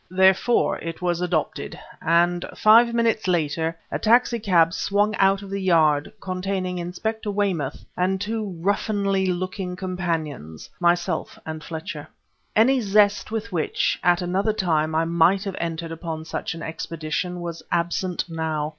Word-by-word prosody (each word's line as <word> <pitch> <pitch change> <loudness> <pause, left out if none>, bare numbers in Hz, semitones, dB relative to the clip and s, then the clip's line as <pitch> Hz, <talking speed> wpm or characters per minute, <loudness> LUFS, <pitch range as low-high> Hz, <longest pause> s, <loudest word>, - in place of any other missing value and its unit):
Therefore 190 +6 +3
it 165 0 -6
was 175 -1 -1
adopted, 175 -4 -2 0.2
and 175 +2 +2
five 230 +2 +6
minutes 230 -3 +1
later 165 -1 0
a - - -2
taxi 235 +1 +3
cab 170 -5 +3
swung 205 +2 +1
out 195 +1 +3
of 195 - -9
the 200 0 -2
Yard 155 -5 +3
containing 185 -1 -3
Inspector 210 +5 -3
Weymouth 190 -9 -1
and 185 +1 0
two 210 -2 -3
ruffianly 200 -1 +1
looking 185 0 -3
companions 165 - -4
myself 175 -1 0
and 155 -1 -6
Fletcher. 160 -2 -6 0.5
Any 255 +4 +4
zest 205 0 +3
with 220 -2 -4
which, 170 -4 0
at 175 0 +3
another 195 +5 0
time, 160 -6 0
I 165 +1 +2
might 170 +4 +3
have 195 -2 -4
entered 165 0 -3
upon 165 -1 -5
such 160 - -4
an 165 - -7
expedition, 165 +2 -4
was 170 -1 -5
absent 175 +1 -1
now. 160 -2 -2
180 Hz, 145 wpm, -23 LUFS, 165-200 Hz, 0.5 s, five